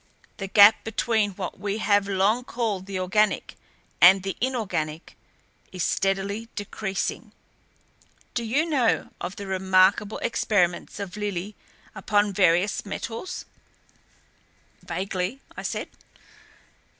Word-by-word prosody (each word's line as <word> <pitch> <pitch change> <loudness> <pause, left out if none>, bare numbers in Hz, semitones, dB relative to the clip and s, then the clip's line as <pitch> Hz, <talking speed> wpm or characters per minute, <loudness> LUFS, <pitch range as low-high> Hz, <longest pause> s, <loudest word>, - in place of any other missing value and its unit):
The 195 - -4
gap 205 +2 +7
between 220 -2 0
what 185 -1 -6
we 205 0 -2
have 205 -2 +2
long 200 +5 +2
called 220 -6 -3
the 195 -1 -4
organic 205 +3 +1 0.5
and 190 +2 +8
the 195 -1 -3
inorganic 190 -11 -2 0.6
is 185 -2 -3
steadily 200 +3 -1
decreasing. 200 -1 -4 1.0
Do 235 - -2
you 265 +8 +1
know 270 -8 +1
of 185 - -4
the 200 - -7
remarkable 190 +2 +2
experiments 200 -6 0
of 200 0 -6
Lillie 205 -1 -4 0.4
upon 205 0 +1
various 180 +1 +2
metals?" 225 - -6 1.4
"Vaguely," 190 +5 -3 0.2
I - - -6
said. - - -3
200 Hz, 110 wpm, -25 LUFS, 190-220 Hz, 1.4 s, and